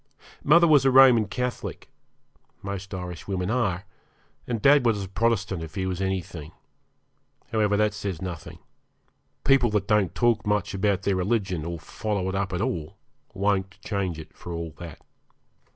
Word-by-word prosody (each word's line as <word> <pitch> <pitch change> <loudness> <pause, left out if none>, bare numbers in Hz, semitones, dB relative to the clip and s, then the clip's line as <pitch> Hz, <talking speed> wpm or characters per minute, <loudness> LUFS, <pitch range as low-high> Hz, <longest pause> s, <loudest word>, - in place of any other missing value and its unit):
Mother 170 +4 +6
was 150 -4 +6
a 135 - +4
Roman 130 -4 +7
Catholic 125 +4 -4 0.8
most 100 -1 -5
Irishwomen 90 +1 -4
are; 100 -6 0 0.6
and 120 -2 -2
dad 140 +4 +5
was 110 -4 +1
a - - -6
Protestant, 100 -3 0
if 80 +2 -8
he 95 -2 -1
was 95 0 -3
anything. 90 -4 -4 1.0
However, 105 -2 +2
that 105 0 +2
says 100 -5 -4
nothing. 85 -3 -7 0.9
People 135 -3 +4
that 105 -2 -1
don't 105 -4 +2
talk 120 -3 +2
much 105 -3 0
about 100 0 0
their 100 -1 +1
religion, 95 -4 -1
or 85 0 -4
follow 100 +3 -3
it - - -3
up 95 -1 -1
at 90 +1 -2
all, 85 -2 -3 0.4
won't 95 -1 0
change 95 -5 -2
it 80 - -11
for 90 - -9
all 85 -1 -4
that. 85 -4 -9
100 Hz, 155 wpm, -25 LUFS, 90-110 Hz, 1.0 s, Roman